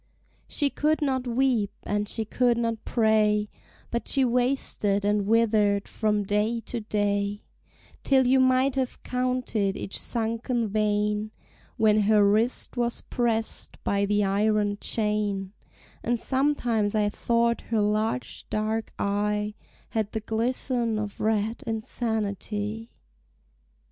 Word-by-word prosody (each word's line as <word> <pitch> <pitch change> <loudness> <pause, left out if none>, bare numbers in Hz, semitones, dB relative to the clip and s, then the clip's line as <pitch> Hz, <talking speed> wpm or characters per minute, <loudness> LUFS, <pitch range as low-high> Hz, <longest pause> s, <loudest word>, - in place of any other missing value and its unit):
She 285 -2 0
could 305 +1 +1
not 260 -3 0
weep, 240 -4 +1
and 205 0 -1
she 225 - -2
could 240 +2 +2
not 230 -1 -1
pray, 215 -2 +2 0.4
But 235 - -2
she 270 -1 +2
wasted 245 -5 +1
and 205 -1 +1
withered 210 -3 +3
from 210 -1 0
day 210 +4 0
to 235 - -5
day, 205 -1 -1 0.6
Till 265 -1 +4
you 260 +2 +4
might 260 +1 +3
have 260 -2 -2
counted 250 -6 -1
each 195 - -4
sunken 230 0 -1
vein, 210 0 0 0.5
When 215 -1 +4
her 210 0 +4
wrist 220 +5 +1
was 240 -1 -1
prest 225 -2 -1
by 200 0 +1
the 205 +1 +2
iron 205 +1 +1
chain; 210 -3 -1 0.5
And 240 0 0
sometimes 245 -7 +1
I 210 -1 +2
thought 235 +2 +1
her 225 -1 +1
large 210 - -1
dark 215 +1 -2
eye 210 +1 0 0.4
Had 215 -2 -2
the 220 - -2
glisten 230 +1 0
of 210 -1 -4
red 220 +1 0
insanity. 220 -1 -3
220 Hz, 125 wpm, -26 LUFS, 210-235 Hz, 0.6 s, Till